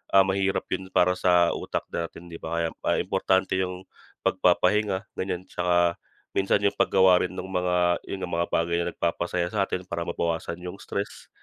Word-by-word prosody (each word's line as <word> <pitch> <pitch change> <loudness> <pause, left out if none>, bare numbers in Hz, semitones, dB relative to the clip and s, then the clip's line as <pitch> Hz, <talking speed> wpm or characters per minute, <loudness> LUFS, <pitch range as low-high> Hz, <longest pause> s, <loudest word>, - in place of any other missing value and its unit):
ah, 95 - +9
mahirap 95 0 0
yun 95 0 -3
para 90 +1 +5
sa 90 -1 +4
utak - - -3
natin, 85 +1 -5
‘di 85 - -8
ba? 85 0 -1
Kaya - - -12 0.3
importante 95 0 +1
yung 90 0 -3 0.4
pagpapahinga, 105 -1 +2
ganyan, 95 -1 -2
tsaka 85 -1 +1 0.4
minsan 95 +1 +2
yung 100 - +3
paggawa 95 -1 +5
rin 90 - -1
nung 95 0 -6
mga, 90 -1 +2
yun 100 - -3
nga, - - -3
mga 85 0 0
bagay 85 +1 +1
na 85 - -1
nagpapasaya 85 +1 -1
sa 100 -2 +2
atin 90 - -3
para 85 -1 -3
mabawasan 85 0 -2
yung 90 +2 -6
stress 100 +1 -5
90 Hz, 175 wpm, -26 LUFS, 85-95 Hz, 0.4 s, ah